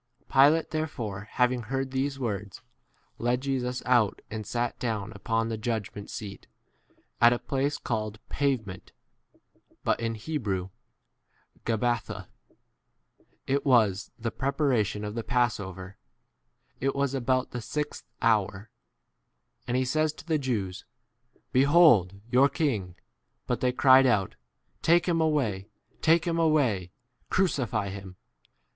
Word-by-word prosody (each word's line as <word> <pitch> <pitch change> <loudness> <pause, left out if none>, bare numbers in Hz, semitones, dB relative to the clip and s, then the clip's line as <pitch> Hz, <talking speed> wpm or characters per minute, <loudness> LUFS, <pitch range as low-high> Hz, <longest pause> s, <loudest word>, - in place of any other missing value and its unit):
Pilate 145 +4 +5
therefore, 115 -10 -4
having 125 0 +2
heard 135 +3 -3
these 135 +1 -1
words, 105 -6 -4 0.6
a - - -7
led 120 +1 +1
Jesus 130 -2 -2
out 120 -5 +3
and 110 -1 -5
sat 120 0 -2
down 110 -5 -2
upon 115 +2 -1
[the] 110 - -2
b - - -14
judgment 105 -3 -3
seat, 100 -2 -7 0.7
at 120 0 +8
a - - 0
place 140 +3 -1
called 110 -2 -3
Pavement, 115 -10 -2 0.9
but - - +1
in 115 0 -2
Hebrew 105 - -3 1.0
Gabba 120 +1 +1
14 - - -27
tha; - - -8 1.2
(it 140 +1 0
was 110 -8 +3
[the] 115 0 -3
preparation 130 -7 0
of 105 - -4
the 115 0 -3
passover; 100 -7 -1 0.8
it 135 +1 0
was 140 -1 +1
c 135 - -2
about 130 +1 0
the 120 - -4
sixth 150 +6 -4
hour 105 -2 +1 0.5
;) - - -45
and 120 - 0
he 130 - +1
says 155 +4 +1
to 155 - -13
the 160 -3 +1
Jews, 105 -9 -2 0.5
15 - - -35
Behold 130 - +5
your 130 +3 +4
king! 105 - -1 0.5
But - - -2
they 125 - +2
cried 130 +1 +6
out, 105 -6 +1 0.5
Take 170 +1 +4
[him] 165 -2 +2
away, 120 -11 0 0.3
take 165 +1 +4
[him] 170 -1 0
away, 130 - +2 0.4
crucify 120 - 0
him. 95 -1 -8
120 Hz, 140 wpm, -28 LUFS, 105-140 Hz, 1.2 s, at